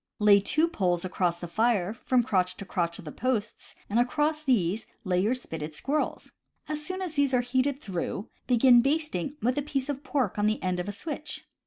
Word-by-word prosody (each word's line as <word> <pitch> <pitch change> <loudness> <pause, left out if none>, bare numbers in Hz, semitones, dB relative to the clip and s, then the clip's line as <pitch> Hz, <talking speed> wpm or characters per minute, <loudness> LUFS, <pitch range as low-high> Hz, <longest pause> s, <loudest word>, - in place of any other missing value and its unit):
Lay 205 -1 +6
two 305 +11 +2
poles 180 - 0
across 180 -2 0
the 175 - -5
fire 215 0 +1
from 245 +1 +1
crotch 185 -6 +1
to 200 - -7
crotch 170 -3 -1
of 195 - -11
the 150 - -6
posts, 230 - -3
and 220 +3 +1
across 300 +5 +1
these 215 - +1 0.2
lay 180 -2 +1
your 220 +6 +2
spitted 160 -10 -6
squirrels. 290 - -2 0.4
As 300 0 -3
soon 370 +4 -3
as 350 -4 -4
these 285 -3 +2
are 245 - +3
heated 260 +3 0
through, 195 - -4 0.2
begin 245 0 +6
basting 285 - -1
with 250 +4 +2
a - - 0
piece 275 -1 -2
of 280 0 -3
pork 255 -7 -1
on 205 - +3
the 215 -1 -1
end 180 -1 0
of 180 - -3
a - - -2
switch. 300 +8 -5
240 Hz, 205 wpm, -28 LUFS, 190-280 Hz, 0.4 s, Lay